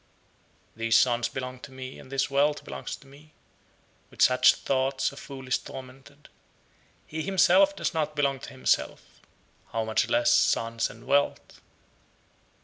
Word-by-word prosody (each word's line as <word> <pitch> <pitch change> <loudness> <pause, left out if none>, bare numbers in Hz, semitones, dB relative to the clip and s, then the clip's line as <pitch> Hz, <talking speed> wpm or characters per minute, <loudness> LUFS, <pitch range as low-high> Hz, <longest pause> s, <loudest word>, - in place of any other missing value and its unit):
62. - - -24
"These 115 -1 +3
sons 120 -2 +2
belong 130 -1 -6
to 135 - -11
me, 130 0 -9
and 130 - -14
this 135 0 0
wealth 145 +2 +1
belongs 70 -1 -6
to - - -19
me," 145 +3 -18 0.8
with - - -20
such 125 0 +5
thoughts 135 0 -1
a - - -13
fool 135 -2 -10
is 125 - +1
tormented. 135 +3 -12 0.8
He 160 +1 -5
himself 195 +2 +4
does - - -2
not 155 -2 -2
belong 140 -2 0
to - - -9
himself; 130 - -2 0.5
how 115 0 -1
much 110 0 0
less 120 0 +3
sons 115 -1 +1
and 115 - -14
wealth? 140 0 0
135 Hz, 150 wpm, -27 LUFS, 125-145 Hz, 0.8 s, such